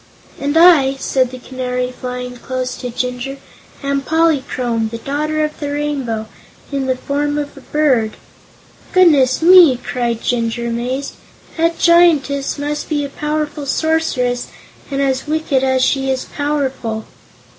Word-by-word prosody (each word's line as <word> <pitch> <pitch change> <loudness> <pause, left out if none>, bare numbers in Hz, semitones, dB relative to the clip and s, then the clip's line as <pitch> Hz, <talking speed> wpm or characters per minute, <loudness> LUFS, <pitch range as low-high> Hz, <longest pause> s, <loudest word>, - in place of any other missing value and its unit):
"And 285 +3 0
I," 320 -6 +6
said 260 -1 0
the 255 - -8
Canary, 250 0 -3
flying 250 0 -6
close 255 0 -4
to 250 - -5
Jinjur, 250 +2 -4 0.5
"am 280 0 0
Polychrome, 265 -7 0
the 230 - -5
Daughter 305 +5 -2
of 305 0 -4
the 290 -1 -3
Rainbow, 275 -7 -2 0.5
in 275 -2 -2
the 260 - +1
form 290 +3 -2
of 290 -1 -4
a 275 - -12
bird." 260 -8 +1 0.8
"Goodness 305 -7 +4
me!" 345 -7 +8
cried 240 -2 -3
Jinjur, 235 -1 -1
amazed; 250 +4 -3 0.4
"that 330 0 +1
Giantess 310 -6 +3
must 295 +1 -3
be 295 -2 0
a - - -6
powerful 300 0 -3
Sorceress, 275 -6 0 0.4
and 275 -1 -1
as 265 +1 -1
wicked 305 -3 0
as 260 -1 +2
she 270 -1 0
is 260 -1 -1
powerful." 270 -7 -2
275 Hz, 140 wpm, -17 LUFS, 250-295 Hz, 0.8 s, me